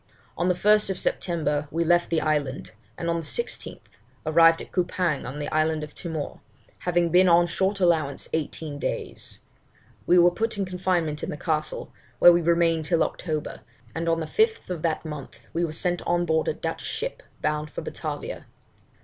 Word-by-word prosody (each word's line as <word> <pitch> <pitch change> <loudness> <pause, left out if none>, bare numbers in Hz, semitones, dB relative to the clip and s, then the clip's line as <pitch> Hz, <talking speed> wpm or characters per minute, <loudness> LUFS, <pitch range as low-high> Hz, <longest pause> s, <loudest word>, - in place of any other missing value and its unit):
On 175 - 0
the 180 - +3
1st 210 0 +3
September 155 -6 -1
we 165 +3 0
left 175 +1 +3
the 165 -2 +1
island, 145 -3 -1 0.3
and 170 - -4
on 170 0 +1
the - - -2
16th, 475 - -4 0.4
arrived 165 +1 +6
at - - -9
Coupang 175 -5 0
in 145 - -8
the 150 - -3
island 155 0 +1
of 150 - -8
Timor, 160 -5 -5 0.4
having 175 -1 +1
been 180 +2 +5
on 170 0 +6
short 190 +3 0
allowance 160 -6 +1
eighteen 155 -1 -3
days. - - -4 0.7
We 180 - +6
were 175 0 +7
put 225 +3 -2
in 195 - 0
confinement 180 -4 -1
in - - -4
the 150 - -4
castle, 155 -1 -2 0.2
where 175 +7 +8
we 175 - +3
remained 165 -1 +2
till 165 0 +3
October, 155 -4 -3 0.3
and 165 +1 -2
on 165 0 +2
the - - -2
5th 445 - +1
of 170 -3 -3
that 165 0 -1
month 150 -3 -7 0.2
were 170 -1 0
sent 175 +2 -1
on 175 0 +2
board 160 -1 +1
a - - +1
Dutch - - -4
ship - - -4 0.2
bound 150 0 -1
for - - -6
Batavia. - - -5
170 Hz, 180 wpm, -25 LUFS, 155-180 Hz, 0.7 s, where